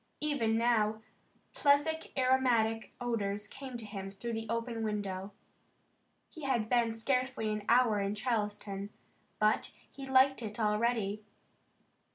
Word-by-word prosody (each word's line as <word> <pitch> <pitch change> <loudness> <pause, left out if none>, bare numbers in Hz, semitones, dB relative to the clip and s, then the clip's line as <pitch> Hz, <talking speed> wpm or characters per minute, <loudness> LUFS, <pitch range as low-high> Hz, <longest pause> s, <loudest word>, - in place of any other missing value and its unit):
Even 240 -7 +1
now, 220 -2 +2 0.5
pleasant 300 +3 +2
aromatic 250 -4 +2
odors 210 -4 -2
came 265 -3 -7
to 230 - -8
him 195 -2 -6
through 230 +4 -5
the 225 -1 -4
open 230 0 -2
window. 205 -3 -3 1.0
He 320 - -11
had 255 -6 0
been 235 -1 +2
scarcely 250 -1 0
an 210 -1 -4
hour 235 -3 +5
in 200 +1 -1
Charleston 210 -3 -2 0.5
but 215 0 +2 0.2
he 270 -1 -8
liked 265 0 +5
it 215 0 -6
already. 215 -1 +1
225 Hz, 125 wpm, -32 LUFS, 210-255 Hz, 1.0 s, hour